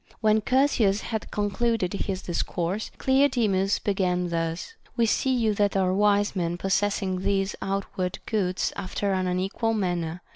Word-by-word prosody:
When 215 Hz, 0 st, +3 dB
Chersias 230 Hz, -5 st, +2 dB
had 220 Hz, -2 st, -4 dB
concluded 210 Hz, -1 st, 0 dB
this 195 Hz, -2 st, -3 dB
discourse, 175 Hz, +3 st, -2 dB
Cleodemus 240 Hz, -8 st, +2 dB
began 180 Hz, -3 st, 0 dB
thus: 165 Hz, -, -3 dB, 0.2 s
We 235 Hz, -, +4 dB
see 245 Hz, +4 st, +1 dB
you 230 Hz, -4 st, +2 dB
that 205 Hz, -1 st, +1 dB
are 185 Hz, -1 st, +2 dB
wise 205 Hz, +1 st, +2 dB
men 175 Hz, -2 st, -1 dB
possessing 195 Hz, 0 st, 0 dB
these 195 Hz, +1 st, 0 dB
outward 195 Hz, -2 st, -2 dB
goods 190 Hz, -4 st, 0 dB
after 195 Hz, +1 st, -2 dB
an 185 Hz, -1 st, 0 dB
unequal 195 Hz, +5 st, 0 dB
manner. 175 Hz, -4 st, -2 dB
195 Hz, 140 wpm, -26 LUFS, 185-215 Hz, 0.2 s, We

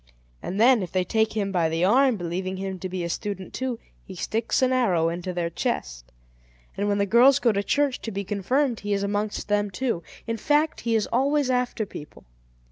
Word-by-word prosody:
And 190 Hz, -, -4 dB
then, 240 Hz, 0 st, +6 dB
if 180 Hz, -, -5 dB
they 185 Hz, -1 st, +1 dB
take 220 Hz, +4 st, +1 dB
him 200 Hz, -2 st, -1 dB
by 170 Hz, -4 st, +1 dB
the 165 Hz, +2 st, +1 dB
arm, 255 Hz, +3 st, +4 dB
believing 185 Hz, +2 st, -3 dB
him 190 Hz, -1 st, -4 dB
to 185 Hz, -, -5 dB
be 180 Hz, -1 st, -3 dB
a -, -, -2 dB
student 190 Hz, +1 st, -5 dB
too, 260 Hz, -2 st, -3 dB, 0.3 s
he 190 Hz, -, -10 dB
sticks 225 Hz, +7 st, -1 dB
an 255 Hz, 0 st, +3 dB
arrow 180 Hz, -10 st, +2 dB
into 175 Hz, +2 st, -4 dB
their 175 Hz, -1 st, -2 dB
chest. -, -, -3 dB, 0.6 s
And 205 Hz, -, -1 dB
when 205 Hz, 0 st, +1 dB
the 200 Hz, -, +2 dB
girls 245 Hz, +6 st, +6 dB
go 240 Hz, -, +3 dB
to 200 Hz, -1 st, 0 dB
church 280 Hz, +4 st, 0 dB
to 225 Hz, -, -5 dB
be 200 Hz, 0 st, -3 dB
confirmed, 230 Hz, +6 st, 0 dB
he 205 Hz, 0 st, -2 dB
is 200 Hz, 0 st, 0 dB
amongst 205 Hz, +1 st, -2 dB
them 205 Hz, 0 st, +1 dB
too. 225 Hz, -2 st, -2 dB, 0.2 s
In 230 Hz, 0 st, -2 dB
fact, 295 Hz, +6 st, +1 dB
he 230 Hz, -1 st, 0 dB
is 220 Hz, -, +2 dB
always 275 Hz, +2 st, +2 dB
after 250 Hz, -3 st, 0 dB
people. 150 Hz, -6 st, -11 dB
205 Hz, 210 wpm, -25 LUFS, 185-245 Hz, 0.6 s, then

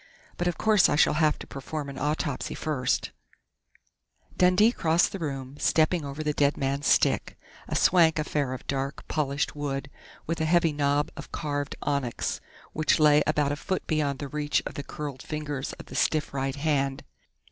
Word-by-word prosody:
But 175 Hz, -, -1 dB
of 175 Hz, -, -1 dB
course 215 Hz, -4 st, +4 dB
I -, -, +2 dB
shall -, -, +4 dB
have 155 Hz, -2 st, +3 dB
to -, -, -9 dB
perform 140 Hz, +2 st, -6 dB
an 140 Hz, -1 st, -7 dB
autopsy 145 Hz, -1 st, -2 dB
first 145 Hz, -5 st, -1 dB, 0.6 s
" -, -, -34 dB
Dundee 185 Hz, +5 st, +5 dB
crossed 165 Hz, -5 st, +2 dB
the 195 Hz, -, -5 dB
room, 135 Hz, -3 st, -5 dB
stepping 160 Hz, +1 st, +2 dB
over 140 Hz, +2 st, -5 dB
the 150 Hz, -1 st, 0 dB
dead 145 Hz, 0 st, +2 dB
man's 140 Hz, +1 st, -1 dB
stick -, -, +2 dB, 0.3 s
a -, -, -3 dB
swank 165 Hz, -3 st, +4 dB
affair 150 Hz, -3 st, -1 dB
of 130 Hz, -, -8 dB
dark, 135 Hz, 0 st, -3 dB
polished 140 Hz, -1 st, -1 dB
wood, 140 Hz, -1 st, -4 dB, 0.3 s
with 165 Hz, 0 st, -2 dB
a -, -, +2 dB
heavy 165 Hz, -1 st, +3 dB
knob 145 Hz, 0 st, +1 dB
of -, -, -9 dB
carved 145 Hz, -1 st, -3 dB
onyx, 140 Hz, -5 st, -2 dB, 0.3 s
which 155 Hz, -1 st, +2 dB
lay 150 Hz, -1 st, +6 dB
about 150 Hz, -2 st, +2 dB
a -, -, 0 dB
foot 185 Hz, +5 st, -3 dB
beyond 150 Hz, -4 st, 0 dB
the 145 Hz, -, -5 dB
reach 150 Hz, +1 st, 0 dB
of -, -, -5 dB
the -, -, -5 dB
curled 140 Hz, -2 st, -6 dB
fingers 150 Hz, -3 st, -4 dB
of -, -, -10 dB
the -, -, -11 dB
stiff 155 Hz, -3 st, +1 dB
right 135 Hz, 0 st, -2 dB
hand. 140 Hz, -2 st, 0 dB
145 Hz, 180 wpm, -27 LUFS, 140-155 Hz, 0.6 s, lay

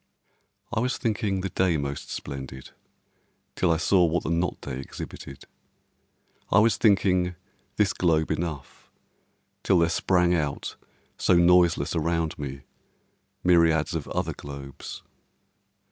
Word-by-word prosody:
I -, -, +1 dB
was 125 Hz, +2 st, 0 dB
thinking 105 Hz, -4 st, -1 dB
the 95 Hz, -, -3 dB
day 90 Hz, -2 st, +1 dB
most 70 Hz, -1 st, -4 dB
splendid 65 Hz, -1 st, -7 dB, 0.8 s
till 90 Hz, -, +2 dB
I 80 Hz, -, +2 dB
saw 90 Hz, +2 st, +3 dB
what 85 Hz, +1 st, +1 dB
the 80 Hz, -, -2 dB
not 85 Hz, +1 st, -1 dB
day 65 Hz, -2 st, -6 dB
exhibited, 65 Hz, 0 st, -9 dB, 1.1 s
I -, -, +4 dB
was 110 Hz, +2 st, +5 dB
thinking 90 Hz, -4 st, +2 dB, 0.4 s
this 105 Hz, -2 st, +2 dB
globe 80 Hz, -3 st, +1 dB
enough 80 Hz, -3 st, -5 dB, 0.7 s
till 95 Hz, -, +3 dB
there 85 Hz, -1 st, +3 dB
sprang 90 Hz, 0 st, +2 dB
out 75 Hz, -5 st, -2 dB, 0.4 s
so 90 Hz, -, +3 dB
noiseless 85 Hz, -3 st, +4 dB
around 80 Hz, -1 st, -1 dB
me 70 Hz, -1 st, -5 dB, 0.8 s
myriads 85 Hz, -2 st, +3 dB
of 80 Hz, -3 st, -3 dB
other -, -, -2 dB
globes. 70 Hz, -1 st, -9 dB
85 Hz, 125 wpm, -26 LUFS, 75-90 Hz, 1.1 s, was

